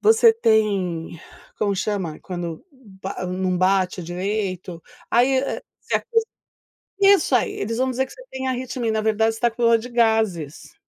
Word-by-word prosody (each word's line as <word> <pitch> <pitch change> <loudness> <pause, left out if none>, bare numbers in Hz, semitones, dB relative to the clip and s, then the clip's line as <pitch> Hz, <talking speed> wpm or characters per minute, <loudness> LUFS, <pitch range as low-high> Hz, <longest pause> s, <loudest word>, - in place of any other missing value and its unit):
você 450 +1 +6
tem", 195 - 0 0.4
como 200 -2 0
chama? 190 -6 -2
Quando 175 - -6
ba 195 -8 -7
não 185 0 -1
bate 185 0 +1
direito, 185 -1 -3 0.3
aí, 255 +3 +4
eh, 270 - -2 0.2
você - - -5
acos 455 -2 0 0.8
isso 395 -8 +5
aí, 240 - +2
eles 225 +3 -3
vão 260 +1 +1
dizer 260 +1 0
que - - -16
você - - -13
tem 265 0 -4
arritmia, 255 -1 -3
e - - +2
na 220 0 0
verdade 220 +1 +2
você - - -8
está 240 0 +2
com 240 - -8
dor 230 0 +6
de 235 +2 -8
gases. 220 - 0
220 Hz, 170 wpm, -22 LUFS, 185-250 Hz, 0.8 s, você